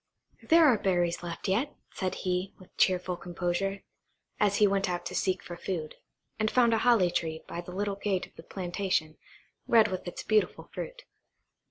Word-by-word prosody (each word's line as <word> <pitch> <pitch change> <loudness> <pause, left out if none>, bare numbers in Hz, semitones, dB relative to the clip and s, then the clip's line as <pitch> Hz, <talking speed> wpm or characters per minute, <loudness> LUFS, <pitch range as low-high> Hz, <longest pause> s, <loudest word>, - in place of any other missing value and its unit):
"There 330 0 +6
are 245 -8 +5
berries 175 -3 +1
left 175 +3 -5
yet," 225 +10 0 0.2
said 185 -1 -2
he, 180 +1 -1
with 185 - -18
cheerful 180 -1 +2
composure, 175 +3 -2 0.6
as 205 -1 +3
he 210 - +5
went 195 -1 +1
out 175 -1 -3
to - - -5
seek 185 -1 0
for 175 - -7
food, 170 -3 -4 0.5
and 215 0 +2
found 235 -1 +4
a 225 - +3
holly 225 -8 +4
tree 160 -2 -2
by 170 - -5
the 175 - -10
little 200 +1 -2
gate 200 -2 -1
of - - -22
the - - -10
plantation, 175 -3 -2 0.5
red 225 -2 +6
with 185 -1 -4
its 175 - -5
beautiful 215 -1 +1
fruit. - - -6
190 Hz, 180 wpm, -29 LUFS, 175-210 Hz, 0.6 s, There